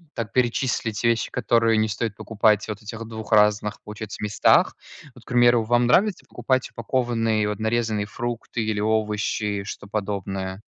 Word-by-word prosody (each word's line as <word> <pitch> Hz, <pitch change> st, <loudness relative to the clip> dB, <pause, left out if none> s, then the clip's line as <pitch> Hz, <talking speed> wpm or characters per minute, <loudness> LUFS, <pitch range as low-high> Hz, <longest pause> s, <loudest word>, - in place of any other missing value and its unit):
так 115 Hz, -3 st, -4 dB
перечислить 120 Hz, -3 st, 0 dB
вещи, 115 Hz, -1 st, +1 dB
которые 115 Hz, -2 st, +2 dB
не 110 Hz, 0 st, +2 dB
стоит 105 Hz, +1 st, -3 dB
покупать 105 Hz, -1 st, +1 dB
в -, -, -12 dB
вот 105 Hz, 0 st, -5 dB
этих 110 Hz, +1 st, -7 dB
2 110 Hz, 0 st, -8 dB
разных, 105 Hz, 0 st, +3 dB
получается, 105 Hz, 0 st, -7 dB
местах. 105 Hz, 0 st, +3 dB, 0.4 s
Вот 125 Hz, -, -16 dB
к -, -, -62 dB
примеру, 120 Hz, -1 st, +4 dB
вам 120 Hz, +2 st, +2 dB
нравится 195 Hz, -, +2 dB
покупать 130 Hz, +2 st, -1 dB
упакованные, 115 Hz, -3 st, 0 dB
вот 105 Hz, -1 st, -3 dB
нарезанные 110 Hz, -2 st, 0 dB
фрукты 120 Hz, 0 st, -4 dB
или 110 Hz, -1 st, -1 dB
овощи, 105 Hz, -1 st, -1 dB
что-то 100 Hz, 0 st, -8 dB
подобное? 95 Hz, -2 st, -3 dB
110 Hz, 155 wpm, -24 LUFS, 105-120 Hz, 0.4 s, примеру